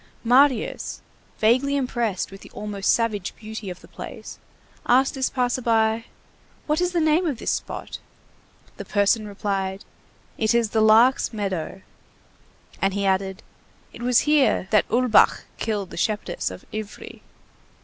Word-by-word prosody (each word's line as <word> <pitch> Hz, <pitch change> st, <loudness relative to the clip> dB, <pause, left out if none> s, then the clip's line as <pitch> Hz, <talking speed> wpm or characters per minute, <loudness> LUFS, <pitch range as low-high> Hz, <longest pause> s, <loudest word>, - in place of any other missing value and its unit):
Marius, 255 Hz, +1 st, +2 dB, 0.4 s
vaguely 255 Hz, +6 st, +3 dB
impressed 240 Hz, -9 st, -1 dB
with 195 Hz, -, -11 dB
the -, -, -13 dB
almost 205 Hz, -2 st, -1 dB
savage 215 Hz, -5 st, -1 dB
beauty 215 Hz, -2 st, -7 dB
of 180 Hz, -, -8 dB
the -, -, -15 dB
place, -, -, -9 dB, 0.5 s
asked 260 Hz, +3 st, +4 dB
this 265 Hz, -1 st, -1 dB
passer 250 Hz, 0 st, -1 dB
by:—"What 230 Hz, +7 st, -2 dB
is 360 Hz, 0 st, +1 dB
the 350 Hz, -, 0 dB
name 315 Hz, +2 st, +2 dB
of 285 Hz, -6 st, -2 dB
this -, -, -2 dB
spot?" -, -, -5 dB, 0.8 s
The -, -, -6 dB
person 210 Hz, +1 st, +1 dB
replied: 195 Hz, -1 st, -3 dB, 0.5 s
"It 220 Hz, +1 st, +2 dB
is 230 Hz, -3 st, +1 dB
the 220 Hz, -, +2 dB
Lark's 225 Hz, +4 st, +5 dB
meadow." 190 Hz, -3 st, -4 dB, 1.0 s
And 195 Hz, 0 st, +1 dB
he 200 Hz, 0 st, -1 dB
added: 190 Hz, 0 st, 0 dB, 0.5 s
"It -, -, -11 dB
was 245 Hz, 0 st, +3 dB
here 295 Hz, -10 st, +2 dB
that 215 Hz, -, +3 dB
Ulbach 245 Hz, -1 st, +4 dB, 0.2 s
killed 210 Hz, -4 st, -2 dB
the -, -, -8 dB
shepherdess 205 Hz, -1 st, -1 dB
of 90 Hz, 0 st, -11 dB
Ivry." 215 Hz, -1 st, -7 dB
220 Hz, 140 wpm, -23 LUFS, 200-250 Hz, 1.0 s, Lark's